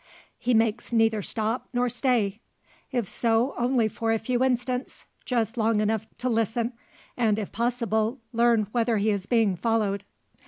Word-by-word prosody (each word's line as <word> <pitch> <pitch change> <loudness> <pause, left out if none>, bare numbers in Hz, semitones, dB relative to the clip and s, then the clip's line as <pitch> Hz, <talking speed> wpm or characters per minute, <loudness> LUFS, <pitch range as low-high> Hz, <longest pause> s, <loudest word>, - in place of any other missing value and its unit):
He 245 -1 +1
makes 225 +1 +1
neither 225 -2 +3
stop, 220 +4 -2
nor 245 0 +1
stay. 235 -5 0 0.5
If 240 -6 -1
so, 230 +5 +1
only 240 -2 +2
for 225 +1 -2
a 225 - +3
few 245 +3 0
instants, 250 0 -1 0.2
just 235 -2 -1
long 225 -1 +2
enough 215 0 0
to 250 - -3
listen, 230 +1 0 0.4
and 220 -4 +2
if 210 -3 -4
possible 235 0 0
learn 235 -2 +3
whether 230 -1 +1
he 210 +2 +2
is 200 -1 -3
being 225 -6 +3
followed. 200 0 0
225 Hz, 155 wpm, -26 LUFS, 220-245 Hz, 0.5 s, neither